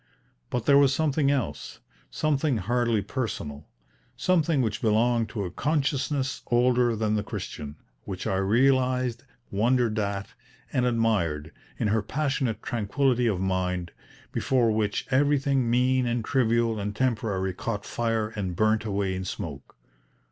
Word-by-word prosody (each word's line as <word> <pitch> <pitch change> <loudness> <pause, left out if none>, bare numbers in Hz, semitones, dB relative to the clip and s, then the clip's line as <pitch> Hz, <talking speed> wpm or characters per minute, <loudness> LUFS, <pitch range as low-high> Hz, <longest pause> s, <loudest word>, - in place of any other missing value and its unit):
But 125 -2 -2
there 140 -1 +6
was 140 -1 +4
something 150 -2 +1
else, 125 - -2 0.3
something 150 -3 0
hardly 115 +1 +1
personal, 80 - -4 0.5
something 165 -6 +2
which 110 -2 -2
belonged 115 +1 +2
to 105 -2 -3
a 90 - -5
consciousness 140 - -1
older 120 -1 +3
than 110 0 0
the 105 - +1
Christian, 75 -7 -6 0.3
which 95 -2 -6
I 95 -4 0
realised, 125 +4 +2 0.3
wondered 115 +1 +2
at, 100 -1 -2 0.4
and 125 -1 +2
admired, 100 -11 0 0.3
in 105 - 0
her 110 +1 +2
passionate 135 -1 -1
tranquillity 120 +2 +1
of 100 -5 0
mind, 90 -2 -1 0.4
before 125 -4 +2
which 105 -1 0
everything 135 -2 +2
mean 125 +1 +2
and 120 -1 -1
trivial 115 -3 +1
and 105 0 -3
temporary 105 -7 0
caught 105 +2 -4
fire 115 -2 -1
and 100 -5 -4
burnt 110 +2 +2
away 100 -3 -1
in 95 - -4
smoke. 80 -7 -7
115 Hz, 135 wpm, -26 LUFS, 100-130 Hz, 0.5 s, there